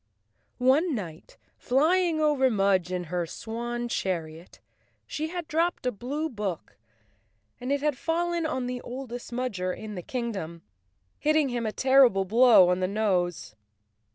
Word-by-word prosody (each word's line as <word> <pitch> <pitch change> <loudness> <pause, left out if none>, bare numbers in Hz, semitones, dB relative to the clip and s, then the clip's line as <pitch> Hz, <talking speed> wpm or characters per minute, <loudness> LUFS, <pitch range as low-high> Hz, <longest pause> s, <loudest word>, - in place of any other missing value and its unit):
One 275 +6 +3
night, 170 -7 -8 0.2
flying 325 +5 +2
over 295 -4 +3
Mudge 195 -5 +1
in 180 -1 -2
her 175 0 -3
swan 240 +5 -4
chariot, 170 -6 -4 0.5
she 310 +1 -3
had 345 -1 -5
dropped 330 -2 0
a 250 - +2
blue 275 +9 -3
book 205 - -5 0.8
and 250 +2 -4
it 280 0 +1
had 295 -3 0
fallen 340 +1 -1
on 260 -5 -2
the 250 0 -4
oldest 245 -1 -7
Mudger 215 -7 -2
in 215 -1 -7
the 180 - -5
kingdom, 195 -8 -5 0.6
hitting 305 -2 +2
him 240 -2 -2
a - - -1
terrible 260 -6 +4
blow 225 -3 +6
on 180 0 +1
the 185 - 0
nose. 180 - -1
240 Hz, 145 wpm, -27 LUFS, 185-280 Hz, 0.8 s, blow